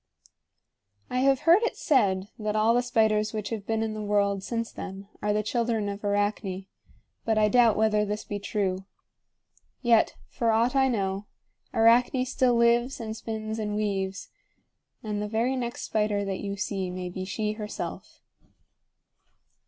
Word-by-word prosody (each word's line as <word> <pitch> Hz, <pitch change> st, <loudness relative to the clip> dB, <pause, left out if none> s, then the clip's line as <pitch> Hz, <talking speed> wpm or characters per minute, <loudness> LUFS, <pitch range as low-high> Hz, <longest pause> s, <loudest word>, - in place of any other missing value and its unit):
I 250 Hz, -, 0 dB
have 270 Hz, 0 st, +3 dB
heard 340 Hz, +5 st, +6 dB
it 470 Hz, -, -1 dB
said 200 Hz, -, +2 dB
that 215 Hz, 0 st, -2 dB
all 215 Hz, +2 st, +4 dB
the 245 Hz, -, +3 dB
spiders 220 Hz, -3 st, +1 dB
which 215 Hz, -2 st, -3 dB
have 220 Hz, -3 st, -5 dB
been 225 Hz, 0 st, 0 dB
in 220 Hz, -1 st, -2 dB
the 215 Hz, -, -5 dB
world 200 Hz, -1 st, +1 dB
since 230 Hz, +2 st, -3 dB
then 195 Hz, 0 st, -8 dB
are 210 Hz, -, +1 dB
the 210 Hz, +1 st, +1 dB
children 230 Hz, -1 st, 0 dB
of 200 Hz, +1 st, -6 dB
Arachne; 205 Hz, -2 st, -1 dB, 0.6 s
but 220 Hz, -1 st, +1 dB
I 215 Hz, -1 st, +4 dB
doubt 235 Hz, -1 st, +5 dB
whether 215 Hz, -1 st, +3 dB
this 210 Hz, +1 st, -3 dB
be 205 Hz, -, -5 dB
true. 195 Hz, -2 st, -2 dB, 1.0 s
Yet, 235 Hz, -2 st, +4 dB
for 230 Hz, -, -1 dB
aught 230 Hz, +4 st, +2 dB
I 265 Hz, -1 st, +4 dB
know, 200 Hz, -4 st, -1 dB, 0.4 s
Arachne 245 Hz, +3 st, +4 dB
still 255 Hz, -1 st, +2 dB
lives 235 Hz, +2 st, +3 dB
and 220 Hz, -1 st, -5 dB
spins 220 Hz, 0 st, -4 dB
and 210 Hz, -1 st, -2 dB
weaves; 195 Hz, -2 st, -2 dB, 0.7 s
and 210 Hz, -1 st, -3 dB
the 210 Hz, -, -2 dB
very 230 Hz, +5 st, 0 dB
next 240 Hz, -2 st, -4 dB
spider 210 Hz, -2 st, 0 dB
that 195 Hz, -1 st, -3 dB
you 200 Hz, 0 st, -4 dB
see 190 Hz, -2 st, -2 dB
may 180 Hz, 0 st, -5 dB
be 185 Hz, +1 st, -5 dB
she 210 Hz, +3 st, -2 dB
herself. 210 Hz, -1 st, -6 dB
215 Hz, 160 wpm, -27 LUFS, 200-230 Hz, 1.0 s, heard